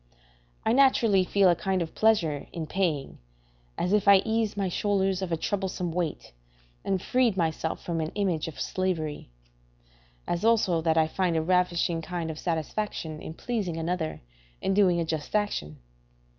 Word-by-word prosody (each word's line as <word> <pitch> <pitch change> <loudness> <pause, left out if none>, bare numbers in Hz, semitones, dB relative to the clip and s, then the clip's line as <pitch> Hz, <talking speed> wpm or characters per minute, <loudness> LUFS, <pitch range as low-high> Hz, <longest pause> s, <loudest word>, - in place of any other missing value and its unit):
I 220 - +3
naturally 240 -7 +4
feel 195 +1 +3
a 175 - +5
kind 190 +2 -1
of 165 -2 -4
pleasure 175 -10 +2
in 165 -2 -4
paying, 155 -5 -2 0.6
as 180 +3 0
if 210 0 +2
I 195 -1 +7
eased 220 -2 0
my 195 -2 0
shoulders 195 0 0
of 185 -2 -3
a 165 - +1
troublesome 190 -1 -2
weight 170 -2 -3 0.5
and 190 -1 0
freed 240 0 +1
myself 160 -2 -1
from 165 -2 -2
an 155 - -3
image 185 -7 0
of 160 - -8
slavery; 165 - -2 1.0
as 175 +2 -2
also 215 -7 +3
that 160 0 +1
I 160 -1 +4
find 175 0 0
a - - +2
ravishing 175 -1 +1
kind 170 -1 -4
of 155 - -8
satisfaction 160 -1 -3
in 160 - -7
pleasing 205 -9 -3
another 165 -1 -2 0.4
and 195 - 0
doing 185 -4 +4
a 165 - 0
just 160 +3 -4
action. 75 - -1
180 Hz, 165 wpm, -27 LUFS, 160-200 Hz, 1.0 s, I